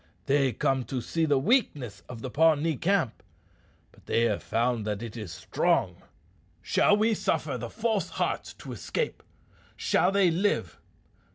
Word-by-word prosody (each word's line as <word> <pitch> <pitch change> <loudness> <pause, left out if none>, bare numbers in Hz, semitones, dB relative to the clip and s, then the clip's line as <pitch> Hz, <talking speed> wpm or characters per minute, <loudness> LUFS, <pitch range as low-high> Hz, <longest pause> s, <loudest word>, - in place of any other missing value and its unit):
They 135 -1 +3
come 135 -1 0
to 130 - -3
see 165 +7 -1
the 145 -3 +3
weakness 145 - +1
of 115 -2 -8
the 130 - -4
Pawnee 160 +1 +3
camp; 175 - 0 0.7
but - - -23
they 115 - +2
have 115 - +1
found 120 0 0
that 105 +1 -2
it 115 -1 -7
is 105 -7 -6
strong. - - 0 0.6
Shall 205 - +3
we 220 +2 +3
suffer 155 -8 -1
the 120 -1 -5
false 220 - -1
hearts - - -2
to - - -9
escape? 480 -2 -3 0.6
Shall - - +2
they 195 -3 +4
live? 195 +5 0
145 Hz, 155 wpm, -28 LUFS, 120-195 Hz, 0.7 s, they